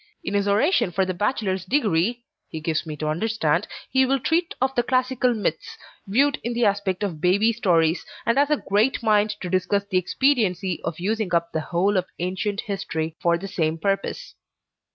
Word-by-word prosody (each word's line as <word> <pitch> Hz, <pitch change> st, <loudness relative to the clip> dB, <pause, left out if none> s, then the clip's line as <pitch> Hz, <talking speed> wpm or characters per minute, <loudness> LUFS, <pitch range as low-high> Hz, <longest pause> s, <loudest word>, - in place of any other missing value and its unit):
In 195 Hz, -, -4 dB
his 200 Hz, 0 st, +1 dB
oration 210 Hz, -, +3 dB
for 190 Hz, +2 st, +1 dB
the 185 Hz, -, -2 dB
bachelor's 195 Hz, -1 st, -1 dB
degree, 235 Hz, -, +1 dB, 0.3 s
he 160 Hz, -, -5 dB
gives 155 Hz, +1 st, -2 dB
me 155 Hz, -, -4 dB
to 155 Hz, -, -3 dB
understand, 170 Hz, 0 st, 0 dB, 0.2 s
he 265 Hz, 0 st, +4 dB
will 270 Hz, +1 st, +1 dB
treat 330 Hz, +6 st, 0 dB
of 260 Hz, +1 st, +1 dB
the 240 Hz, -, +2 dB
classical 255 Hz, 0 st, +1 dB
myths, 210 Hz, -, -3 dB, 0.3 s
viewed 275 Hz, +8 st, +2 dB
in 240 Hz, -, -2 dB
the 235 Hz, 0 st, +1 dB
aspect 200 Hz, -1 st, 0 dB
of 170 Hz, -7 st, -3 dB
baby 200 Hz, +6 st, +3 dB
stories, 170 Hz, -7 st, +2 dB, 0.2 s
and 230 Hz, +4 st, +2 dB
has 285 Hz, 0 st, +3 dB
a 300 Hz, -, +3 dB
great 215 Hz, +6 st, +2 dB
mind 215 Hz, -1 st, +3 dB
to 180 Hz, -, -4 dB
discuss 190 Hz, +2 st, 0 dB
the 185 Hz, -, +4 dB
expediency 190 Hz, -, +1 dB
of 165 Hz, 0 st, -4 dB
using 205 Hz, -1 st, -1 dB
up 170 Hz, 0 st, 0 dB
the 160 Hz, -, -1 dB
whole 190 Hz, +5 st, +1 dB
of 180 Hz, -, +1 dB
ancient 190 Hz, +4 st, -2 dB
history, 160 Hz, -5 st, -4 dB
for 170 Hz, 0 st, +3 dB
the 195 Hz, +3 st, -7 dB
same 160 Hz, -3 st, -1 dB
purpose. 195 Hz, +4 st, -2 dB
200 Hz, 190 wpm, -23 LUFS, 175-235 Hz, 0.3 s, he